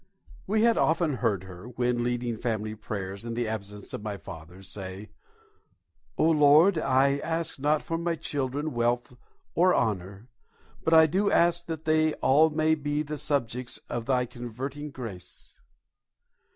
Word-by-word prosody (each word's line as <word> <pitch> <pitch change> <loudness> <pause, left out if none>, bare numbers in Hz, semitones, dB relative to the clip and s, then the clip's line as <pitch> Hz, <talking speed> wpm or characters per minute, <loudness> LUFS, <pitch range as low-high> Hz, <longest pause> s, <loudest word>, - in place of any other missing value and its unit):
We 215 +3 +2
had 230 -1 +4
often 160 -4 +2
heard 105 -5 0
her, 95 +3 -10
when 125 0 0
leading 120 -1 -1
family 110 -2 -2
prayers 100 -2 -5
in 115 -1 -5
the 120 -1 -1
absence 105 -2 -6
of - - -4
my 105 -1 -4
father, 90 +2 -11
say, 95 +1 -8 1.1
"O - - +2
Lord, 160 +3 +5
I 140 0 +2
ask 165 -1 -2
not 150 +2 +1
for 165 0 -3
my 170 0 -1
children 145 -1 -3
wealth 120 +1 0 0.4
or 180 +2 +4
honour, 100 0 -2 0.6
but 160 - +3
I 160 0 +8
do 195 +6 +1
ask 170 0 +2
that 160 -1 -5
they 155 0 +2
all 155 +4 +4
may 155 +1 +2
be 145 0 -1
the 150 0 -5
subjects 125 -4 -2
of 120 -1 -4
Thy 125 -2 +2
converting 130 +5 -6
grace." 105 -10 -10
130 Hz, 150 wpm, -27 LUFS, 110-155 Hz, 1.1 s, I